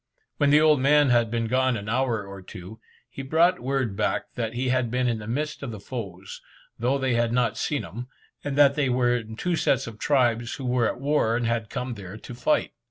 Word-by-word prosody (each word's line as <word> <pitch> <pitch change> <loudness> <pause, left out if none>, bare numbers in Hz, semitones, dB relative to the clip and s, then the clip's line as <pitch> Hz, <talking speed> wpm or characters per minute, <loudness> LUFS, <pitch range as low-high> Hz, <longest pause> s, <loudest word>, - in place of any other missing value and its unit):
When 145 - +3
the 150 +1 +6
old 155 -2 +5
man 145 0 +4
had 120 -2 +3
been 115 0 -1
gone 130 +1 +1
an 100 0 -7
hour 115 -2 0
or 100 -1 -9
two, 95 +4 -11 0.3
he - - -8
brought 165 +6 +3
word 130 -5 -1
back - - -1
that 115 -1 -3
he 125 +1 -1
had 125 -2 +1
been 125 +1 0
in 115 -2 0
the 105 - -8
midst 150 +6 -3
of 140 - -5
the 110 -3 -7
foes, 95 -5 -7 0.4
though 125 +4 +1
they 130 -2 0
had 120 -1 +1
not 120 0 +1
seen 145 -3 -2
him, 120 +9 -7 0.4
and 145 -1 -3
that 140 -1 +6
they 140 -2 0
were 125 -1 +2
in 110 -1 -7
two 175 +8 -1
sets 135 -6 +1
or - - -5
tribes 120 -1 +1
who 135 - -7
were 125 -2 +2
at - - -3
war, 140 -5 +1
and 120 - -1
had 115 -2 -1
come 125 -1 -4
there 100 -2 -9
to 115 - -10
fight. 125 +5 0
125 Hz, 230 wpm, -25 LUFS, 115-135 Hz, 0.4 s, the